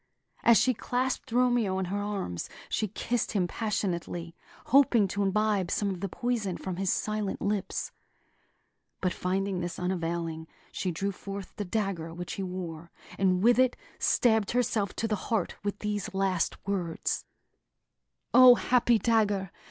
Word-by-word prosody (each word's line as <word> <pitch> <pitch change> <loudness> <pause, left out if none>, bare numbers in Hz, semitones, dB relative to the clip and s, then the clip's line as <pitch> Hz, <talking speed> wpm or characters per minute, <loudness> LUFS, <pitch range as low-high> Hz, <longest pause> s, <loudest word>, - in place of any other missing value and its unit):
As 235 -2 +6
she 255 - +4
clasped 255 +3 -2
Romeo 240 -5 +2
in 190 - -1
her 200 +3 -2
arms, 195 - -3 0.2
she 215 - 0
kissed 230 +4 -2
him 195 -4 +2
passionately, 175 -5 -3 0.3
hoping 250 -6 +5
to 200 - -2
imbibe 200 -1 +1
some 200 +1 0
of 185 - -5
the 195 - -2
poison 220 -5 -2
from 185 -2 -5
his 195 -1 +1
silent 215 -2 -1
lips; 200 -1 -2 1.1
but 185 -2 0
finding 190 +1 -1
this 175 -1 -4
unavailing, 170 -3 -2 0.2
she 185 - -2
drew 195 +4 -2
forth 195 0 -8
the 205 - -4
dagger 180 -5 -2
which 175 0 -5
he - - -4
wore, 175 -3 -5 0.3
and 185 -1 +2
with 240 +2 +5
it 255 -1 +3 0.2
stabbed 220 -4 +3
herself 230 -5 0
to 225 - -1
the 215 - 0
heart 220 -6 0
with 205 0 -2
these 210 0 -3
last 190 -3 +1
words: 185 -4 -2 1.1
"O, 255 -1 +10
happy 240 -1 +3
dagger! 205 -4 +1
200 Hz, 150 wpm, -29 LUFS, 180-220 Hz, 1.1 s, O